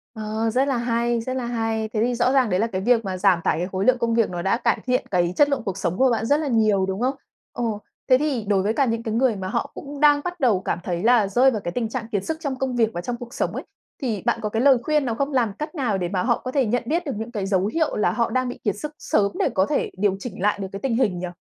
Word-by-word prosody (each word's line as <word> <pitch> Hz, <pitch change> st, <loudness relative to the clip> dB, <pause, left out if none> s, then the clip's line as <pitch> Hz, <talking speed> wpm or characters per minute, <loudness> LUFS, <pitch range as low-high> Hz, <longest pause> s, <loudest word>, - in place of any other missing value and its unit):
Ờ, 220 Hz, +1 st, -2 dB
rất 260 Hz, +5 st, +1 dB
là 270 Hz, -, +1 dB
hay, 235 Hz, 0 st, 0 dB
rất 255 Hz, +2 st, -4 dB
là 250 Hz, -2 st, -2 dB
hay. 225 Hz, -2 st, -1 dB
Thế 215 Hz, -, 0 dB
thì 245 Hz, 0 st, 0 dB
rõ 240 Hz, +2 st, +2 dB
ràng 260 Hz, -5 st, +3 dB
đấy 180 Hz, 0 st, +1 dB
là 225 Hz, -, +2 dB
cái 190 Hz, -3 st, -3 dB
việc 230 Hz, 0 st, +2 dB
mà 185 Hz, -1 st, -3 dB
giảm 180 Hz, -1 st, +3 dB
tải -, -, +1 dB
cái 180 Hz, +2 st, -2 dB
khối 190 Hz, +2 st, -1 dB
lượng 255 Hz, 0 st, +4 dB
công 230 Hz, -1 st, 0 dB
việc 230 Hz, -2 st, +2 dB
nó 175 Hz, -1 st, -4 dB
đã 195 Hz, +5 st, +1 dB
cải 235 Hz, -, +1 dB
thiện 250 Hz, +2 st, +1 dB
cái 175 Hz, -1 st, +1 dB
chất 290 Hz, 0 st, +4 dB
lượng 280 Hz, -4 st, 0 dB
cuộc 195 Hz, -3 st, -3 dB
sống 180 Hz, -2 st, -2 dB
của 265 Hz, 0 st, +4 dB
bạn 225 Hz, -1 st, 0 dB
rất 290 Hz, +5 st, +3 dB
là 310 Hz, -, -2 dB
nhiều, 215 Hz, -5 st, +2 dB
đúng 190 Hz, +3 st, -3 dB
không? 260 Hz, +2 st, +1 dB, 0.4 s
Ừ, 240 Hz, -, -3 dB, 0.5 s
thế 255 Hz, -, +7 dB
thì 270 Hz, -7 st, -1 dB
đối 195 Hz, -2 st, +2 dB
với 215 Hz, +3 st, +1 dB
cả 275 Hz, -, +2 dB
những 230 Hz, -1 st, -1 dB
cái 220 Hz, -, -3 dB
người 235 Hz, -1 st, +2 dB
mà 190 Hz, -1 st, -5 dB
họ -, -, -2 dB
cũng 285 Hz, 0 st, -8 dB
đang 290 Hz, -1 st, +5 dB
bắt 355 Hz, 0 st, -5 dB
đầu 235 Hz, -, +3 dB
cảm 175 Hz, -, -2 dB
thấy 175 Hz, +1 st, -3 dB
là 235 Hz, -3 st, +4 dB
rơi 250 Hz, +7 st, +4 dB
vào 215 Hz, -4 st, -3 dB
cái 175 Hz, -, -4 dB
tình 230 Hz, +2 st, -2 dB
trạng 230 Hz, -1 st, -4 dB
kiệt 200 Hz, -2 st, -1 dB
sức 320 Hz, 0 st, -2 dB
trong 280 Hz, -5 st, -3 dB
công 265 Hz, -2 st, -1 dB
việc 225 Hz, -2 st, +3 dB
và 175 Hz, -, -3 dB
trong 240 Hz, +5 st, -4 dB
cuộc 245 Hz, +2 st, -10 dB
sống -, -, -1 dB
ấy, -, -, -4 dB, 0.4 s
thì 225 Hz, -8 st, -2 dB
bạn -, -, +1 dB
có 210 Hz, -, -2 dB
cái 225 Hz, +2 st, -1 dB
lời 270 Hz, -1 st, +6 dB
khuyên 300 Hz, -3 st, +1 dB
nào 230 Hz, -, -1 dB
không? 280 Hz, +4 st, -1 dB
Làm 230 Hz, -6 st, +1 dB
cách 305 Hz, +3 st, -5 dB
nào 240 Hz, -, 0 dB
để 175 Hz, -2 st, -2 dB
mà 185 Hz, -2 st, -1 dB
họ 235 Hz, -1 st, +1 dB
có 255 Hz, -, -2 dB
thể 270 Hz, -1 st, +2 dB
nhận 240 Hz, +3 st, 0 dB
biết 335 Hz, +6 st, -1 dB
được 280 Hz, -, -2 dB
những 225 Hz, +2 st, -5 dB
cái 205 Hz, -4 st, -3 dB
dấu 195 Hz, -1 st, +1 dB
hiệu 310 Hz, +9 st, 0 dB
là 210 Hz, -, +2 dB
họ 235 Hz, -1 st, 0 dB
đang 255 Hz, -1 st, 0 dB
bị -, -, -7 dB
kiệt 205 Hz, -, +1 dB
sức 300 Hz, +6 st, -5 dB
sớm 200 Hz, -1 st, +1 dB
để -, -, +2 dB
có 190 Hz, -, +3 dB
thể 295 Hz, -, -1 dB
điều 195 Hz, -1 st, +1 dB
chỉnh 200 Hz, -6 st, -7 dB
lại 205 Hz, 0 st, +1 dB
được 195 Hz, -, -3 dB
cái 195 Hz, -, -6 dB
tình 245 Hz, -4 st, 0 dB
hình 200 Hz, -8 st, +1 dB
nhỉ? 180 Hz, -, -3 dB
230 Hz, 315 wpm, -23 LUFS, 200-255 Hz, 0.5 s, thế